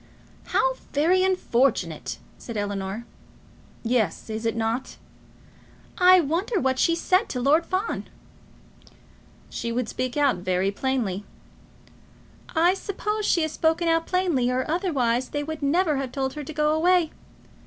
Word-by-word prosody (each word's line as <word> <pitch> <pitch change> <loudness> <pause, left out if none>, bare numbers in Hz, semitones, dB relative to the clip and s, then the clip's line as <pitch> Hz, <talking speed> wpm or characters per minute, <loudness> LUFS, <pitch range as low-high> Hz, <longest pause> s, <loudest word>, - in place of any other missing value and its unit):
"How - - +2 0.2
very 335 +6 +3
unfortunate!" 245 - 0 0.2
said 235 -3 -7
Ellinor. 205 +2 -3 0.8
"Yes; 225 -3 0
is 220 +1 -2
it 225 - -1
not?" 230 +3 -2 1.0
"I 365 0 +8
wonder 350 - 0
what 260 -3 0
she 335 - +3
said 370 +5 +1
to 250 - -3
Lord 295 +6 +3
Fawn?" 375 +4 -2 1.5
"She 235 - -3
would 240 0 -1
speak 255 +3 -3
out 285 -8 +3
very 185 +2 0
plainly." 215 -4 -1 1.3
"I 340 +3 +4
suppose 420 +2 -3
she 335 - +3
has 315 - -1
spoken 325 +2 +1
out 330 0 +2
plainly, 345 -10 +1
or 255 +1 0
otherwise 265 -8 0
they 290 0 -2
would 315 0 -6
never 305 +1 +2
have 270 -2 -3
told 265 -1 -2
her 300 - -6
to 310 - -6
go 300 0 +1
away. 345 0 +3
285 Hz, 140 wpm, -25 LUFS, 235-340 Hz, 1.5 s, I